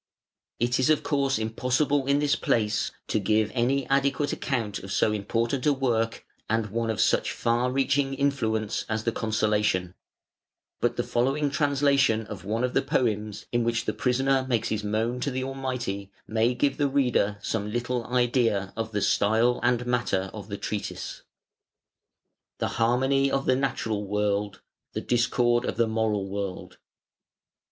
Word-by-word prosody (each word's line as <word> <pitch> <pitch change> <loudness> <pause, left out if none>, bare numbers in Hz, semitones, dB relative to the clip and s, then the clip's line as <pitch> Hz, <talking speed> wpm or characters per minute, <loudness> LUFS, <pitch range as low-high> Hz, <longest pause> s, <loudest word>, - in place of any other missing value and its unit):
It 120 +2 +1
is 130 - +2
of 155 - +3
course 140 -2 +1
impossible 130 +5 0
in 140 0 +3
this 145 0 +2
place 105 -2 0 0.2
to 110 - +1
give 105 +1 +1
any 130 +2 +1
adequate 140 +1 +1
account 115 -7 -2
of 95 - -9
so 105 - +2
important 115 +6 -1
a 145 - +5
work 115 -4 -1 0.2
and 110 -2 0
one 115 +1 -1
of 110 - -2
such - - +2
far 120 +2 0
reaching 135 +1 +1
influence 110 -7 0
as 110 0 -1
the 115 - +1
"Consolation" 105 -5 0 0.9
but - - +1
the - - -1
following 135 +4 0
translation 140 -6 +2
of 105 -5 -8
one 110 +5 -1
of 125 - 0
the - - +3
poems 105 -4 -1
in 120 0 +1
which 115 0 0
the - - -1
prisoner 130 +1 +1
makes 115 -2 +1
his 110 -1 -2
moan 110 +4 -1
to 140 - -1
the 130 -1 -2
Almighty 125 -7 -4
may 115 +3 +1
give 140 +1 +1
the 145 - +2
reader 125 -7 +1
some 105 +1 -2
little 120 +1 -2
idea 120 -6 +1
of 110 0 -4
the 105 - 0
style 115 +4 +3
and 125 0 +1
matter 115 -6 0
of 105 -3 -8
the 100 -1 -5
treatise. 100 0 -5 1.4
THE - - -1
HARMONY 135 +4 +3
OF 135 0 -1
THE 130 - +3
NATURAL 115 -6 -1
WORLD: 105 -1 -1 0.3
THE - - -3
DISCORD 120 0 +2
OF - - -3
THE 115 -1 +3
MORAL 110 -3 0
WORLD. 100 -1 -5
120 Hz, 160 wpm, -26 LUFS, 105-135 Hz, 1.4 s, a